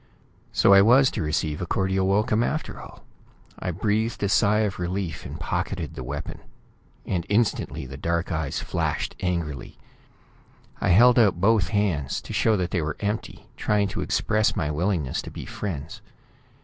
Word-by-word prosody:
So 100 - +5
I 100 - +8
was 125 +5 +5
to - - -3
receive 75 0 -1
a 90 - -3
cordial 95 +1 0
welcome 105 +3 +2
after 155 +6 -2
all! - - -13 0.6
I - - -3
breathed 110 +5 -1
a 100 - +1
sigh 100 +1 +3
of 105 -4 -2
relief, 90 -2 -3
and - - -8
pocketed - - -3
the 65 - -7
weapon 70 +5 -6 0.7
and 90 -3 -1
instantly 105 - 0
the 65 +1 -8
dark 85 +4 -1
eyes 80 -4 -2
flashed - - -2
angrily. 85 -6 -3 1.0
I - - 0
held 120 +7 +6
out 100 -7 +4
both 105 +1 +3
hands, 95 -11 0
to - - -8
show 110 -2 +2
that 90 -2 -2
they 90 - 0
were 75 -1 -3
empty, 105 +1 -4
trying 105 -1 +1
to - - -4
express 110 0 +1
my 75 -1 -1
willingness 80 -3 -1
to - - -9
be - - -8
friends. 85 -7 -6
95 Hz, 165 wpm, -25 LUFS, 80-105 Hz, 1.0 s, I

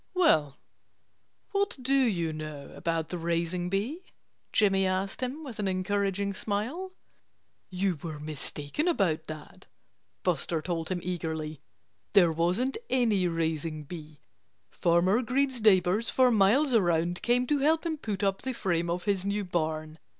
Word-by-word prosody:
"Well, 155 - +3 0.9
what 400 -4 0
do 260 +2 0
you 195 -12 +2
know 155 -2 -7
about 165 -1 -2
the 180 - -4
raising 170 +1 -1
bee?" 220 - -2 0.5
Jimmy 195 -2 +3
asked 190 +4 -2
him 260 +5 -3
with 250 -7 -8
an 205 - 0
encouraging 200 +1 0
smile. 240 - -3 0.8
"You 185 -3 -1
were 155 -3 -6
mistaken 150 - -3
about 170 - +1
that," 155 -1 -10 0.6
Buster 165 - 0
told 165 0 -3
him 180 -2 -2
eagerly. 160 -4 -3 0.5
"There 180 -5 +6
wasn't 180 - 0
any 220 -8 +2
raising 160 -2 -2
bee. 155 -1 -10 0.5
Farmer 180 +6 +3
Green's 260 0 0
neighbors 200 +1 +4
for 255 -1 +4
miles 235 +7 +4
around 175 -4 +2
came 245 +1 +2
to 290 +3 +1
help 315 +4 +2
him 320 -2 -1
put 210 -7 -4
up 195 -1 +1
the 260 - -3
frame 170 -6 -1
of 175 +1 -2
his 200 -3 0
new 200 +1 -1
barn. 155 -2 -2
185 Hz, 145 wpm, -29 LUFS, 165-235 Hz, 0.9 s, There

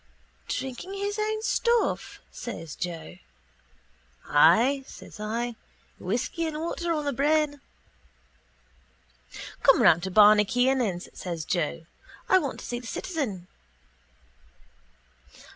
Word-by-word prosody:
—Drinking 265 +9 -4
his 405 +1 -3
own 435 0 -1
stuff? 470 0 0
says 165 -10 -7
Joe. 165 - -6 1.1
—Ay, 230 - +4
says - - -12
I. 230 +3 -3 0.4
Whisky 245 - -2
and 310 -1 -4
water 340 +1 -2
on 305 -3 -1
the 285 - 0
brain. 290 +1 +1 2.0
—Come - - +6
around 165 - +6
to 190 - -3
Barney 210 +2 +7
Kiernan's, 245 -5 +1
says 170 -4 -5
Joe. 165 -1 -2 0.4
I 375 - +5
want 280 -6 -4
to - - -9
see 240 - -4
the 245 - -10
citizen. 240 - -4
245 Hz, 110 wpm, -27 LUFS, 190-310 Hz, 2.0 s, Barney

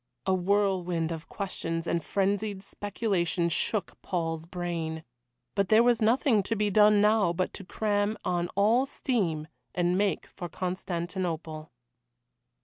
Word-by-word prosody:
A 190 - +2
whirlwind 180 -3 +1
of 165 -1 -6
questions 165 -4 -3
and 170 -1 0
frenzied 200 +1 -1
speculation 195 -5 -1
shook 200 +5 -1
Paul's 165 -2 -2
brain. 170 -3 -3 0.5
But 200 -1 0
there 220 +2 +6
was 240 -1 +3
nothing 230 0 +4
to 225 +4 -2
be 210 -1 +1
done 210 0 +6
now 210 -4 +4
but 185 +2 -1
to 200 - -7
cram 205 +2 0
on 175 -1 0
all 225 +7 +3
steam 175 - -1 0.3
and 175 0 +2
make 205 -1 +1
for 175 -2 -8
Constantinople. 175 -3 -3
190 Hz, 135 wpm, -28 LUFS, 170-210 Hz, 0.5 s, there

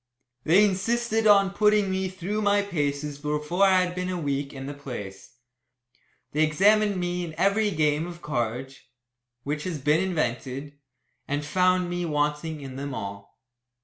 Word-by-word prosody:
They 190 +6 +6
insisted 225 +3 0
on 200 -2 +5
putting 210 -1 +3
me 190 0 -1
through 190 +3 -3
my 205 -1 +3
paces 145 -5 -2
before 150 +5 +1
I 190 -1 +5
had 180 0 -3
been 180 0 -3
a 185 - -2
week 140 -2 -2
in 135 -1 -7
the 145 - -5
place. 105 -10 -8 1.0
They 155 +2 +2
examined 200 +6 +3
me 175 0 -2
in 160 -2 -7
every 205 +2 +2
game 155 -2 +1
of 175 -1 -9
cards 130 0 -3 0.6
which 145 +1 -3
has 180 -4 -3
been 150 +4 +2
invented 140 -5 -2 0.5
and 145 +1 -2
found 185 +2 +2
me 175 0 -2
wanting 150 0 -1
in 135 -1 -8
them 140 0 -4
all. 100 -1 -7
160 Hz, 155 wpm, -26 LUFS, 145-190 Hz, 1.0 s, They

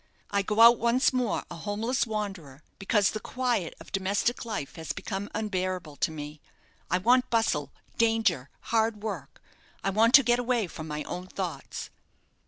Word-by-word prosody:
I 200 0 +2
go 210 +3 +1
out 235 +1 +9
once 240 +4 +3
more 250 -4 0
a - - -5
homeless 220 +7 -1
wanderer, 195 -10 -5 0.2
because 200 0 +2
the 215 - -4
quiet 245 -8 -1
of - - -13
domestic 200 +6 0
life 210 -11 -4
has 160 -2 -4
become 200 0 -5
unbearable 185 -7 -2
to - - +1
me. 150 -1 -8 0.5
I 180 - +3
want 250 +6 +3
bustle, 150 -12 +1 0.3
danger, 225 - +2 0.2
hard 220 -2 +1
work. 180 -11 -5 0.4
I 195 - +1
want 225 +4 +5
to 275 - +9
get 240 0 +3
away 245 -3 +1
from 160 -2 -8
my 150 0 -4
own 180 +4 -6
thoughts." 185 -3 -5
205 Hz, 165 wpm, -28 LUFS, 175-230 Hz, 0.5 s, out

